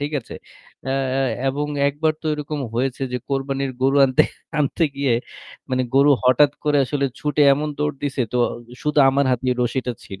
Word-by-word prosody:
ঠিক 145 +1 -2
আছে? 115 - -11 0.5
অ্যা 135 +1 -1 0.5
এবং 145 +2 -2 0.2
একবার 155 +3 0
তো - - -5
এরকম 150 0 -5
হয়েছে 130 +2 -1
যে 125 - -1
কোরবানির 135 0 -2
গরু 135 +2 +3
আনতে 130 -1 +4 0.4
আনতে 150 +3 +1
গিয়ে 140 -3 +1 0.6
মানে 130 0 +1
গরু 140 +2 +5
হঠাৎ 130 +3 +5
করে 145 -1 +3
আসলে 140 +2 -2 0.2
ছুটে 150 0 +1
এমন 150 +2 -3
দৌড় 150 0 -1
দিছে 140 -2 -1
তো - - 0 0.5
শুধু 150 0 0
আমার 140 +1 +2
হাতে 125 +1 0
রশিটা 125 +1 -1
ছিল 95 -2 -10
140 Hz, 170 wpm, -21 LUFS, 130-145 Hz, 0.6 s, গরু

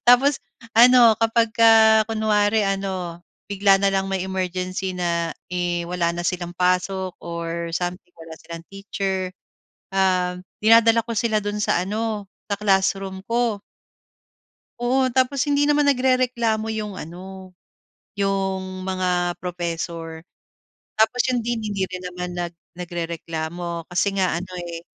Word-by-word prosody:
Tapos 265 +4 +6 0.4
ano, 240 -1 +8
'kapagka 225 -1 +5
kunwari 215 -1 +2
ano, 190 -3 -3 0.3
bigla 195 -1 +4
na 200 - +1
lang 195 0 0
may 190 -1 -1
emergency 185 0 -3
na, 170 -1 -1 0.2
eh, 175 -1 -1
wala 175 -1 0
na 175 - -3
silang 175 -1 -2
pasok 185 +1 0
or 170 0 -4
something, 175 +1 -4
wala 165 -1 -10
silang 165 0 -9
teacher, 195 -1 -3 0.6
um, 180 -2 +1 0.2
dinadala 230 +1 +6
ko 230 - -5
sila 220 0 +1
do'n 205 0 -2
sa 175 - +1
ano, 215 0 -2 0.3
sa 200 - +1
classroom 195 -1 +1
ko. 230 -3 0 1.2
Oo, 255 +2 +1
tapos 260 +2 +1
hindi 290 0 +3
naman 295 -1 +3
nagrereklamo 250 -4 +1
yung 215 -2 -4
ano, 185 +2 -9 0.7
yung 190 -1 -1
mga 180 -2 -1
professor. 170 -2 -4 0.8
Tapos 220 +3 +3
yung 245 -1 +1
dean, 235 -1 -1
hindi 200 -3 -1
rin 185 0 -7
naman 180 0 -5
nag 175 -1 -3 0.2
nagrereklamo 170 -1 -5
kasi 185 +3 +1
nga, 185 -3 +1
ano 185 - -8
eh, 170 -1 -7
190 Hz, 125 wpm, -23 LUFS, 175-220 Hz, 1.2 s, ano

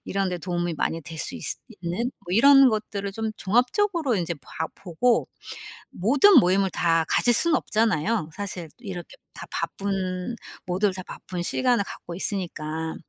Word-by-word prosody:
이런 195 -1 -1
데 180 - -3
도움이 175 -1 -2
많이 165 +1 -2
될 165 0 -9
수 255 - -1
있을 - - -3 0.2
있는 180 +9 -2
뭐 - - -28
이런 275 +5 +7
것들을 205 -2 -3
좀 220 +1 -3
종합적으로 255 - +1
인제 170 -2 -2
봐 160 +5 -5
보고 195 +7 +1 0.6
모든 275 - +6
모임을 190 +2 +2
다 165 -1 +2
가실 245 - +3
수는 335 +7 +3
없잖아요. 215 -4 0
사실 190 -4 -5
이렇게 190 - -8 0.2
다 - - -9
바쁜 190 +1 -3 0.3
모두들 185 +2 +1
다 185 - -6
바쁜 175 0 -6
시간을 245 +3 +1
갖고 170 - -8
있으니까. 160 -4 -3
195 Hz, 310 characters per minute, -25 LUFS, 175-230 Hz, 0.6 s, 이런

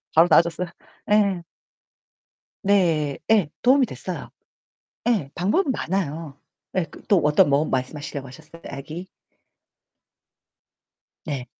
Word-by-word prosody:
바로 165 +2 +7
나아졌어요. 170 +1 +3 0.4
예. 200 -4 +3 1.2
네. 165 -8 +2
예, 205 -9 +4
도움이 260 +1 +5
됐어요. - - -6 0.8
예, 190 - +1
방법은 260 - +1
많아요. 160 - -3 0.4
예, 180 - +2
그 - - -14
또 200 - +5
어떤 150 -1 +5
뭐 140 +2 +3
말씀하시려고 135 +1 -3
하셨어요? 160 +4 -14
아기? 155 +7 -7 2.2
네. 140 -6 -4
165 Hz, 215 characters per minute, -24 LUFS, 145-195 Hz, 2.2 s, 바로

